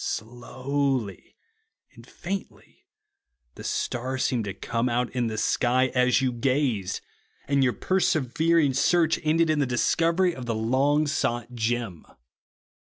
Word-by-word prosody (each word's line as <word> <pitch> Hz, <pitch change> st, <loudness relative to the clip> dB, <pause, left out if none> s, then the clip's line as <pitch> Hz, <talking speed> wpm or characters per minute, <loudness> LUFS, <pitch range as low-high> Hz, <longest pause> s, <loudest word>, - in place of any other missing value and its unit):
Slowly 125 Hz, -1 st, -3 dB, 0.6 s
and -, -, -16 dB
faintly 195 Hz, +2 st, -7 dB, 0.7 s
the -, -, -11 dB
star 130 Hz, +2 st, -2 dB
seemed 125 Hz, -4 st, 0 dB
to 100 Hz, -, -4 dB
come 115 Hz, +4 st, -2 dB
out 120 Hz, +1 st, -1 dB
in 125 Hz, -2 st, -1 dB
the 110 Hz, -1 st, -4 dB
sky, 125 Hz, +3 st, +2 dB
as 125 Hz, +1 st, +2 dB
you 130 Hz, -, +1 dB
gazed; 125 Hz, -5 st, -1 dB, 0.5 s
and 140 Hz, 0 st, +2 dB
your 125 Hz, -2 st, +2 dB
persever 165 Hz, -3 st, +1 dB
ing 145 Hz, -5 st, +3 dB
search 165 Hz, +3 st, +2 dB
ended 160 Hz, +1 st, +2 dB
in 155 Hz, -, +1 dB
the 140 Hz, -, +1 dB
discovery 170 Hz, +8 st, +2 dB
of 125 Hz, -4 st, -8 dB
the 115 Hz, -, -1 dB
long 135 Hz, +7 st, +2 dB
sought 125 Hz, -5 st, -2 dB
gem. 115 Hz, -6 st, -2 dB
130 Hz, 135 wpm, -26 LUFS, 120-145 Hz, 0.7 s, ing